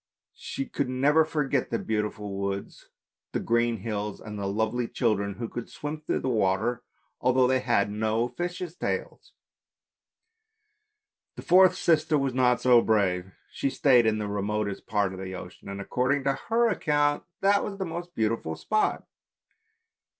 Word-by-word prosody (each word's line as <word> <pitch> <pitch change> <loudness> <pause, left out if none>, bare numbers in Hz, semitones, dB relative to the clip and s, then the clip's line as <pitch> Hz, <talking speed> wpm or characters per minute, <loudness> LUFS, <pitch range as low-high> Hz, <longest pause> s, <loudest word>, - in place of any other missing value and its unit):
She 135 - -4
could 140 -1 -2
never 145 +5 +4
forget 145 -4 -1
the 115 - 0
beautiful 105 -2 -3
woods, 100 0 -5 0.4
the - - 0
green 120 0 +1
hills 105 -1 -3
and 105 -1 -7
the 100 - -2
lovely 110 +4 -1
children 100 -5 0
who 115 +1 -4
could 120 +1 -7
swim 150 +1 -6
in - - 0
the - - -1
water 110 0 +1 0.4
although 130 0 +3
they 130 +1 +3
had 100 -4 +1
no 110 +2 0
fishes' 175 +3 -5
tails. - - -4 2.0
The - - -8
fourth 185 0 +6
sister 155 -3 +2
was 135 -2 0
not 125 -1 +3
so 125 -2 +6
brave, 95 -4 +1 0.2
she 140 - -1
stayed 125 -4 +4
in 110 0 +2
the 105 -1 -3
remotest 100 0 -2
part 100 -3 0
of 95 - -8
the 95 0 -5
ocean, 90 +2 -10
and, 100 0 -5
according 130 +7 0
to 135 - +2
her 235 +1 +3
account, 145 -8 +1 0.2
that 200 +1 +4
was 195 - -5
the 190 - -2
most 175 +1 -6
beautiful 110 -7 -1
spot. 215 - 0
120 Hz, 155 wpm, -27 LUFS, 105-145 Hz, 2.0 s, fourth